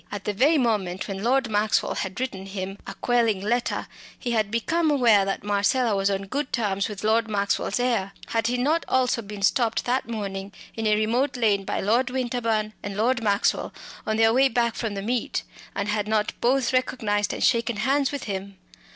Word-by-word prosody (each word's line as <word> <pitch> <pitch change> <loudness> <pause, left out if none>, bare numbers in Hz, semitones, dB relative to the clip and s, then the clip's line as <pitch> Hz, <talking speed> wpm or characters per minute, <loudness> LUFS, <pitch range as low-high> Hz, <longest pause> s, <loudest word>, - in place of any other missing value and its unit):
At 205 -1 -5
the 210 - -2
very 280 +10 +4
moment 205 -8 0
when 195 -1 -5
Lord 255 +3 +2
Maxwell 215 0 +1
had 190 +2 -4
written 195 -7 -4
him 195 0 -5
a 195 - -6
quelling 230 -4 +1
letter, 235 +5 -1 0.3
he 240 - -3
had 215 -3 +1
become 315 +9 +1
aware 235 -9 +4
that 195 -1 -3
Marcella 205 +3 +2
was 195 0 +1
on 195 0 -1
good 265 +8 -3
terms 200 -3 0
with 205 -1 -7
Lord 225 +1 +2
Maxwell's 200 +2 0
heir. 230 -6 0 0.2
Had 225 -1 0
he 250 +1 0
not 300 +7 +1
also 255 -2 +2
been 205 -1 -8
stopped 230 +2 +2
that 250 -1 0
morning 200 -3 -4 0.2
in 225 -1 -1
a 210 - +4
remote 245 +6 0
lane 205 -4 +2
by - - -2
Lord 235 +5 +2
Winterbourne 230 -4 -1
and 200 -1 -5
Lord 235 +3 +2
Maxwell 205 -2 +1 0.3
on 220 0 0
their 225 0 +4
way 265 +2 +4
back 235 -1 +1
from 220 -4 -3
the 195 - -4
meet, 240 +2 -1 0.3
and 200 - -2
had 210 -1 -1
not 215 -1 +1
both 255 0 +2
recognised 220 -5 0
and - - -3
shaken 235 -1 +2
hands 270 +5 +1
with 285 -2 -4
him? 195 -1 -5
220 Hz, 195 wpm, -25 LUFS, 200-245 Hz, 0.3 s, very